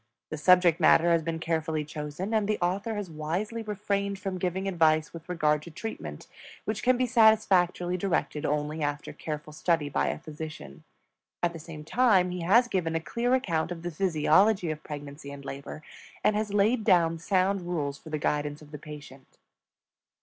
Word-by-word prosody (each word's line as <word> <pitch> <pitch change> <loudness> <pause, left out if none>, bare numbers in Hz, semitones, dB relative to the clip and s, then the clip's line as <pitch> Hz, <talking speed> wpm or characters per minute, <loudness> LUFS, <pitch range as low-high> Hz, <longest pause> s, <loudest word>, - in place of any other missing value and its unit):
The 155 - -3
subject 180 0 +5
matter 170 +1 +5
has 165 -1 +3
been 165 0 -3
carefully 160 -1 -1
chosen, 150 +7 -5
and 215 -2 +2
the 215 0 +1
author 195 +5 -1
has 205 -4 -5
wisely 180 +9 -3
refrained 200 -2 -2
from 190 -1 -4
giving 185 +2 -2
advice 160 -4 +2
with 165 +1 -10
regard 150 -4 +1
to 170 - -10
treatment 220 +7 -7 0.4
which 215 -1 -2
can 255 0 +3
be 255 - +2
satisfactorily 200 -6 +3
directed 170 -5 -1
only 150 +1 -1
after 145 0 -3
careful 150 -1 -6
study 160 -1 0
by - - 0
a - - -1
physician. 155 - -9 0.6
At 175 -1 +2
the 165 - -8
same 155 -1 -9
time 190 -1 +3
he 180 0 -4
has 225 +8 +4
given 170 -7 -1
a - - +2
clear 240 +9 0
account 170 -10 -1
of 170 -1 -6
the 175 - -3
physiology 185 +2 +3
of 155 0 -6
pregnancy 145 -1 -8
and 140 -1 -10
labor, 140 +3 -7 0.4
and 210 - +3
has 210 -1 -1
laid 215 +3 +2
down 165 -4 +3
sound 190 +2 +1
rules 150 -6 -3
for - - -12
the 155 - -2
guidance 150 0 -2
of 150 - -16
the 150 - -7
patient. 145 -3 -12
170 Hz, 180 wpm, -28 LUFS, 155-195 Hz, 0.6 s, subject